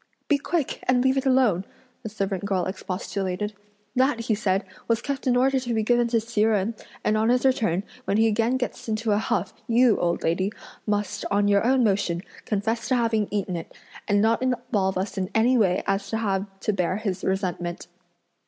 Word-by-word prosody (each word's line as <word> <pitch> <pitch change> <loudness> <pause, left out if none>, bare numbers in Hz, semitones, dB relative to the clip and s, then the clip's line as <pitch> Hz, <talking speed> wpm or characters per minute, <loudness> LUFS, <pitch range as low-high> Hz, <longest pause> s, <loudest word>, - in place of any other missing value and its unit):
"Be 290 -2 +3
quick, 315 0 -1
and 250 -1 +3
leave 265 0 +3
it 270 0 0
alone!" 255 -9 +3 0.4
a 220 - -4
servant 195 -3 -3
girl 190 -3 0
expostulated, 190 +1 -3 0.4
"that, 255 -2 +2
he 230 -1 0
said, 195 -1 0 0.2
was 230 -1 +2
kept 275 +1 -4
in 245 -1 +4
order 265 +1 +3
to 245 -2 -3
be 220 - +1
given 240 +1 +3
to 230 -1 +2
Hsi 225 -1 -2
Jen; 215 0 +2 0.3
and 215 - +2
on 220 +1 +2
his 250 +2 +2
return, 215 -8 +2 0.2
when 200 - +1
he 225 - +4
again 225 +3 +2
gets 250 -2 -4
into 220 0 0
a 205 - +3
huff, 190 -3 -1
you, 240 -1 +4
old 170 0 0
lady, 185 +5 +1 0.4
must, 205 -1 -1
on 205 0 +2
your 200 0 +3
own 255 +1 +3
motion, 190 -5 +1 0.2
confess 225 +2 -1
to 260 - +2
having 225 -3 +1
eaten 200 -3 -2
it, 165 - -7 0.3
and 205 -1 +3
not 225 +2 +2
involve 245 -7 0
us 195 +1 -2
in 185 0 -2
any 235 +3 +4
way 190 -6 +2
as 195 0 -1
to 225 - -1
have 200 -3 -1
to 210 - 0
bear 185 0 0
his 195 -4 -3
resentment." 180 -3 -2
215 Hz, 200 wpm, -25 LUFS, 195-240 Hz, 0.4 s, in